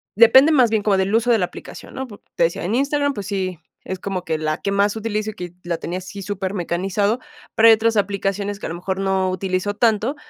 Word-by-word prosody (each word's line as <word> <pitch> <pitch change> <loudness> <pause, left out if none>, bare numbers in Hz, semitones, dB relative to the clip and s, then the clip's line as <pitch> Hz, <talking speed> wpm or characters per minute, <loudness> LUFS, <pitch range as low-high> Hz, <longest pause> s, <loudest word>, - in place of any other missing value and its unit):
depende 250 +8 +7
más 255 -7 +5
bien 220 -2 0
como 200 -2 +2
del 190 +2 0
uso 235 +2 +2
de 230 - +5
la 180 - +1
aplicación, - - -11
¿no? 265 0 -4
Po 205 -3 -12 0.2
te - - +2
decía, 170 - 0
en 195 +6 -1
Instagram, 285 +2 +1
pues 205 -6 -6
sí, 185 -4 -3 0.3
es 185 -1 -5
como 190 -2 -4
que 160 -2 -1
la 155 0 -1
que 200 - -1
más 200 +1 +2
utilizo 215 -1 -2
y - - -16
que 180 -3 -7
la 175 -1 -2
tenía 180 +3 -4
así 195 +2 -9
súper 195 -1 -4
mecanizado, 195 +5 -1 0.4
pero, 225 +1 +6
hay - - +9
otras 225 0 +1
aplicaciones 200 0 -1
que - - -7
a - - -3
lo 165 - -4
mejor 190 +2 -4
no 190 -1 +1
utilizo 185 +2 -2
tanto, 225 +4 +1
200 Hz, 245 wpm, -21 LUFS, 185-220 Hz, 0.4 s, hay